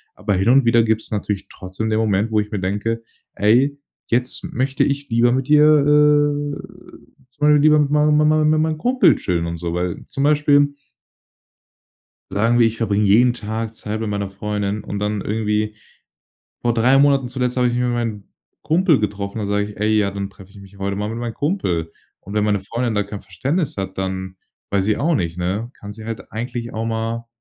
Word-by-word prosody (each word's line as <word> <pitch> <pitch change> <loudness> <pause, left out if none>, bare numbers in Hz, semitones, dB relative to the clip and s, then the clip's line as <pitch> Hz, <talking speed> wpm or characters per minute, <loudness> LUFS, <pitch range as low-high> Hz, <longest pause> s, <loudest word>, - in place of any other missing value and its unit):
Aber 105 - -2
hin 95 +4 +1
und 135 +1 +5
wieder 115 0 +4
gibt's 110 0 -1
natürlich 105 -2 -3
trotzdem 95 +4 -5
den 110 - +1
Moment, 105 0 +1
wo 110 - +2
ich 105 +1 -3
mir 105 - -2
denke: 105 +5 -2 0.3
„Ey, 130 +7 +3 0.3
jetzt 125 +2 -1
möchte 135 +2 0
ich 140 0 -1
lieber 115 +1 +3
mit 130 +1 0
dir, 150 0 +6
äh, 145 -1 +3 0.8
zum 145 - -36
Beispiel 150 0 +5
lieber 150 0 +5
mit 145 -1 +2
mein 150 0 +3
mein 150 0 +4
mein 155 0 +3
mein 155 0 +3
meinem 160 0 0
Kumpel 250 +9 +3
chillen 85 -2 -2
und 85 0 -4
so“, 85 0 -4
weil 90 0 -3
zum 135 - -3
Beispiel 145 -1 +3 1.6
sagen 115 +4 +2
wir, 115 - +5
ich 115 0 -2
verbringe 105 -2 +1
jeden 120 +5 +4
Tag 110 0 -5
Zeit 110 0 -5
mit 110 - -2
meiner 100 -1 -3
Freundin 105 +1 -3
und 100 - -5
dann 105 0 -2
irgendwie 105 0 -1 0.9
vor 120 - +2
3 120 +4 +4
Monaten 140 -2 +3
zuletzt 125 0 -2
habe 125 -1 +3
ich 120 - 0
mich 125 - 0
mit 125 -1 0
meinem 115 -4 -3 0.4
Kumpel 165 -2 +3
getroffen. 105 0 -3
Dann 105 - -2
sag 100 0 0
ich: 105 - -11
„Ey, 110 +1 +1
ja, 100 -2 +1
dann 100 0 -5
treffe 95 -1 -16
ich 100 - -14
mich 100 0 -15
heute 100 0 -2
mal 105 +1 -2
mit 115 +1 -5
meinem 120 -1 -4
Kumpel“. 90 - -2 0.3
Und 100 - -9
wenn 105 -1 +2
meine 105 -2 +1
Freundin 115 +4 -3
da 105 - +1
kein 100 0 -8
Verständnis 135 - -2
hat, 95 -1 -5
dann 95 0 -4 0.3
weiß 100 -1 +1
ich 110 - +2
auch 165 +4 +1
nicht, 85 - -2
ne, 95 +6 -2
kann 100 0 -8
sie 110 +1 -11
halt 115 0 -7
eigentlich 120 +1 -5
auch 110 +1 -3
mal, 115 +1 -3
110 Hz, 210 wpm, -20 LUFS, 100-135 Hz, 1.6 s, dir